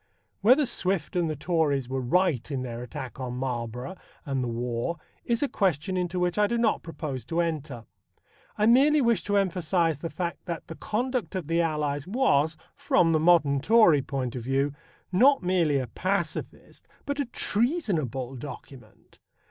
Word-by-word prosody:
Whether 255 +8 +5
Swift 190 -8 -2
and 175 -2 +1
the 155 - -2
Tories 145 -4 0
were 130 +1 -2
right 150 -1 +1
in 135 -3 -3
their 120 -1 -5
attack 125 +1 -7
on 125 -1 -4
Marlborough 125 +4 -4 0.3
and 135 -3 -1
the - - -2
war 120 +6 -2 0.3
is 235 +2 0
a - - +2
question 185 - 0
into 180 0 -1
which 180 +3 0
I 210 - +4
do 235 - -1
not 230 -2 +1
propose 150 -6 -5
to 165 +5 -2
enter. 150 -8 -3 0.7
I 210 - +2
merely 275 +6 +5
wish 235 -4 +2
to 205 0 +1
emphasize 175 -4 +1
the 165 - -4
fact 170 0 -4
that 170 -3 -5
The - - -8
Conduct 235 - -2
of 185 -4 -3
the 165 +2 +1
Allies 150 -2 -1
was, 160 - +2 0.2
from 275 - +2
the 160 - +3
modern 155 -4 +4
Tory 215 -10 +5
point 130 -3 -4
of 125 - -4
view, 135 +3 0 0.4
not 260 +6 +5
merely 175 -5 +2
a 130 - -1
pacifist, 175 +6 -4 0.2
but 285 0 -3
a 285 - +1
treasonable, 195 - -1
document. 125 -3 -11
165 Hz, 170 wpm, -27 LUFS, 135-200 Hz, 0.7 s, Whether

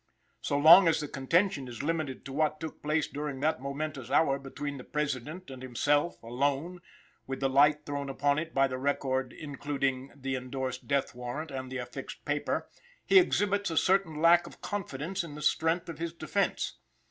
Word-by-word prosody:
So 140 - 0
long 165 +5 +9
as 165 - +3
the 150 - -3
contention 145 +2 +1
is 120 +2 -6
limited 155 -4 -2
to 135 - -7
what 155 +1 +1
took 160 -1 -7
place 150 +1 +1
during 145 -2 -4
that 155 -3 +1
momentous 140 -2 -4
hour 140 -1 +3
between 140 +1 -6
the - - -8
President 150 +4 -3
and 130 -1 -9
himself, 145 +5 0
"alone," 140 +9 -1 0.5
with 135 0 -4
the 135 - +2
light 145 +2 +4
thrown 140 -1 -3
upon 145 +2 +1
it 165 +1 -5
by 135 -2 +3
the 130 -1 -4
record 130 -2 0
including 140 -2 -3
the 135 -1 -3
endorsed 130 0 -4
death 140 -1 0
warrant 125 +6 -5
and 130 -1 -5
the 130 - -3
affixed 125 +2 -7
paper, 145 0 -1 0.4
he 390 - +7
exhibits 205 - +1
a 165 - -3
certain 185 -5 +2
lack 170 +1 +5
of - - -13
confidence 190 -2 -3
in 155 -3 -8
the 150 - -8
strength 165 +3 +1
of 165 -2 -7
his 165 -1 -3
defense. 170 - -1
145 Hz, 180 wpm, -30 LUFS, 135-160 Hz, 0.5 s, long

